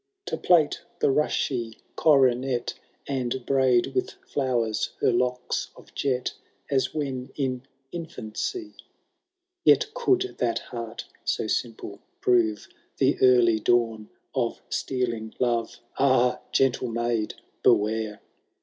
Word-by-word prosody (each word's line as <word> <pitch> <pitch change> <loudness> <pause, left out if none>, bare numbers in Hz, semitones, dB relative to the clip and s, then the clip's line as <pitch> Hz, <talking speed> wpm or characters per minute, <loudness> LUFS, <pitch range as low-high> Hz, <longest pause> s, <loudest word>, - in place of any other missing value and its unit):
To 425 - -2
plait 165 -5 +3 0.2
the - - +3
rushy 125 -5 0 0.2
coronet, 130 -4 +3 0.3
And 130 -2 -2
braid 130 -3 +3
with 380 +2 -1
flowers 120 - 0
her - - +3
locks 125 +1 -1
of - - -17
jet, 130 -2 -1 0.4
As 130 -2 +2
when 135 -4 -3
in 130 -3 -1 0.3
infancy 170 - -4
v— - - -13 0.8
Yet - - +4
could 385 -6 +2 0.2
that 120 -2 +1 0.2
heart, 115 -1 -5 0.2
so - - 0
simple, 110 -2 -3 0.2
prove 110 -4 +2 0.3
The - - +2
early 120 -3 +5
dawn 115 -1 +1 0.2
of - - -1
stealing 115 -4 -2
love: 120 -2 0 0.2
Ah! 130 -2 +4
gentle 130 -1 +2
maid, 115 -1 -1 0.3
beware 110 0 +2
125 Hz, 115 wpm, -26 LUFS, 115-135 Hz, 0.8 s, early